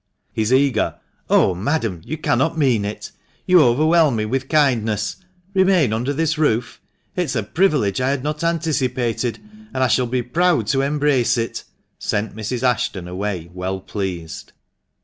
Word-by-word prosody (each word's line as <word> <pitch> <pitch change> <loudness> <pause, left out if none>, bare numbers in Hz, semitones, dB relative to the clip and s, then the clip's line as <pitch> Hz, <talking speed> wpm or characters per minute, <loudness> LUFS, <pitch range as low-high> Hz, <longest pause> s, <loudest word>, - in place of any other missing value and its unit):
His 110 +1 0
eager 130 -4 +2 0.3
"Oh, 95 - +4
madam, 105 - -2
you 155 - -5
cannot 150 +2 0
mean 125 -9 +2
it! 105 +1 -6 0.3
You 180 -2 +6
overwhelm 155 +3 +4
me 110 -1 -1
with 135 +4 -2
kindness. 110 -9 +1 0.4
Remain 185 - +3
under 120 +5 -1
this 160 +2 0
roof! 125 -6 0 0.3
It 180 - 0
is 135 - -4
a 110 - 0
privilege 130 - +1
I 130 - +1
had 140 -2 -1
not 150 +2 -3
anticipated, 130 -8 -1 0.4
and 130 - +1
I - - +4
shall 125 +1 +2
be 125 +1 -1
proud 165 - +1
to 135 - +2
embrace 140 -3 +1
it!" 115 0 -3 0.3
sent 105 +1 -2
Mrs. 115 +3 -4
Ashton 110 -7 0
away 90 -2 -4
well 95 +1 -3
pleased. 90 -5 -6
125 Hz, 155 wpm, -20 LUFS, 110-150 Hz, 0.4 s, You